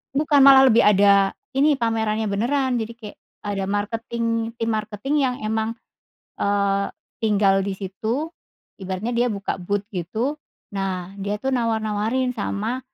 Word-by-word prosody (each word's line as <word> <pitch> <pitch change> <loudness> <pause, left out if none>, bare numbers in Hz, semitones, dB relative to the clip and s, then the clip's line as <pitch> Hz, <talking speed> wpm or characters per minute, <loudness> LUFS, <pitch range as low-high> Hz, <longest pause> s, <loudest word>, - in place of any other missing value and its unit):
Bukan, 290 0 +3
malah 270 -1 +8
lebih 230 - +5
ada, 200 -1 +5 0.2
ini 295 +1 +4
pamerannya 220 -3 0
beneran 250 +4 0
jadi 225 +1 -4
kayak 215 -3 -11 0.3
ada 200 -2 -2
marketing 225 +3 -2 0.3
tim 230 -1 -2
marketing 215 +6 -2
yang 250 -2 0
emang, 220 +1 -1 0.7
eee, 200 -1 +1 0.3
tinggal 200 -3 +3
di 200 0 -2
situ 220 - -3 0.5
ibaratnya 190 +5 -3
dia 240 +1 +2
buka 200 -1 -3
booth 200 +3 -1
gitu. 220 - -2 0.4
Nah 190 -2 -3
dia 200 +1 -2
tuh 265 +4 -2
nawar-nawarin 225 +1 0
sama 225 +3 -3
220 Hz, 135 wpm, -22 LUFS, 200-240 Hz, 0.7 s, malah